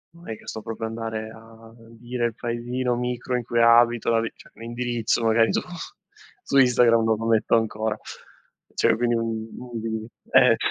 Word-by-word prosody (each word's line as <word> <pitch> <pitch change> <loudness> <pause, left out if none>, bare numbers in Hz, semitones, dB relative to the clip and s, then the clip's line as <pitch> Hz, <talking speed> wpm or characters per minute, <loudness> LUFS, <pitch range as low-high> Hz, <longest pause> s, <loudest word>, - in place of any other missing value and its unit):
non 170 +1 -15
è 110 - -3
che - - -19
sto 110 - -5
proprio 115 0 -4
andare 110 -1 -5
a 115 0 -15 0.2
dire 120 +1 -4
il 115 - -1
paesino 120 +1 -2
micro 125 +1 -2
in 125 - -1
cui 120 0 0
abito, 115 0 +5
la 115 -1 +3
vi 115 - -3
cioè - - -17
l'indirizzo 120 0 -2
magari 115 0 +3
su - - +1 0.8
su 140 - 0
Instagram 120 -3 +5
non 110 -1 +2
lo 115 - -4
metto 115 0 +3
ancora. 110 -1 0 0.8
Cioè - - +3
quello 120 0 +1
è - - -1
inutile. 115 0 -5 0.2
Eh, 125 -3 +6
115 Hz, 175 wpm, -24 LUFS, 115-120 Hz, 0.8 s, Eh